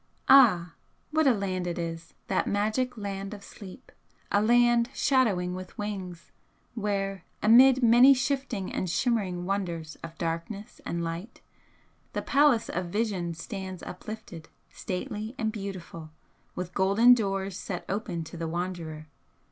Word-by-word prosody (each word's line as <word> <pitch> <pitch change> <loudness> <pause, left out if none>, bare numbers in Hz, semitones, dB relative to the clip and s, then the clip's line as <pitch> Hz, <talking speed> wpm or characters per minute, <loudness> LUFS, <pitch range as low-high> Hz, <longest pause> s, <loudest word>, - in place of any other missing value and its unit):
Ah, 195 -11 +6 0.4
what 315 -1 +3
a - - +7
land 190 -5 -2
it 175 - -3
is, 165 -1 -5
that 190 - 0
magic 220 +5 0
Land 200 0 -5
of 200 - -13
Sleep! 200 +4 -12 0.4
a 205 - +3
land 240 +1 +4
'shadowing 205 -10 +2
with 185 0 -8
wings,' 190 -5 -6 0.4
where 195 -4 -2 0.2
amid 255 +4 +7
many 245 +4 +7
shifting 260 -7 -2
and 185 - -2
shimmering 190 -4 0
wonders 170 -5 -3
of 165 0 -10
darkness 170 +5 -5
and 170 0 -2
light, 170 +7 -6 0.7
the - - -2
Palace 280 -5 +3
of 180 0 -3
Vision 185 -4 -2
stands 190 0 -7
uplifted, 180 -4 -8 0.2
stately 210 +5 -5
and 220 -1 -1
beautiful, 190 -6 -7 0.5
with 180 0 -5
golden 200 +6 +5
doors 195 -4 -1
set 180 -1 -5
open 190 -4 -3
to 160 +2 -10
the 165 0 -3
wanderer! 165 -2 -4
195 Hz, 135 wpm, -28 LUFS, 175-225 Hz, 0.7 s, a